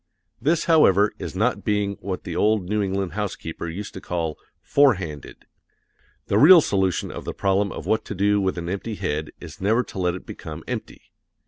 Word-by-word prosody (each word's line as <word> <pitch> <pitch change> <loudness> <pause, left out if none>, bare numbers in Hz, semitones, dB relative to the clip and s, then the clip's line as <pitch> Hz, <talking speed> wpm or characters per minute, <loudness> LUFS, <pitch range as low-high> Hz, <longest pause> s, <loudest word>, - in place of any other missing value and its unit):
This, 160 +3 +1
however, 105 - +5
is - - -6
not 115 +6 0
being 105 -2 0
what 95 -2 -4
the - - -5
old 105 -3 +2
New 105 +2 0
England 95 -2 -1
housekeeper 85 -4 -4
used 100 +5 -6
to 95 - -8
call 80 -3 -3 0.3
"forehanded." 95 - +1 0.8
The - - +2
real 170 +4 +9
solution 95 - 0
of - - -7
the - - -5
problem 100 0 +1
of - - -7
what 110 0 +1
to 105 - -6
do 100 +2 +2
with 95 -1 -1
an 85 -1 -4
empty 100 +4 -4
head 80 -6 -3
is - - -11
never 110 +6 +2
to 95 - -9
let 90 -1 +1
it 90 - -9
become - - -8
empty. - - -7
100 Hz, 190 wpm, -23 LUFS, 90-105 Hz, 0.8 s, real